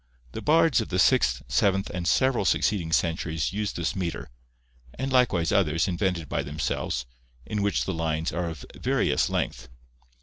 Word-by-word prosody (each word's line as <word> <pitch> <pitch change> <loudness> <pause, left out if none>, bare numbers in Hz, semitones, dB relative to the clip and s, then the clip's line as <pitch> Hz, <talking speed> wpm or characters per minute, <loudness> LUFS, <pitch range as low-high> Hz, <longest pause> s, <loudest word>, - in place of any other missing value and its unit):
The - - -6
bards 160 -2 +4
of 110 - -6
the 90 - -1
sixth, 60 -7 +3
seventh, 95 +10 +1
and 90 -1 -3
several 125 - +2
succeeding 90 -3 +1
centuries 80 0 0
used 105 0 -2
this 85 -1 -2
metre, 90 -3 -4 0.7
and 135 +1 -3
likewise 100 -11 +3
others, 85 -4 +2
invented 90 -3 -1
by - - -1
themselves, 70 -4 -3 0.4
in 105 -1 -2
which 100 0 0
the 95 - -2
lines 80 0 -1
are 85 -1 -2
of 80 -5 -8
various - - +1
length. - - -3
85 Hz, 160 wpm, -26 LUFS, 80-100 Hz, 0.7 s, bards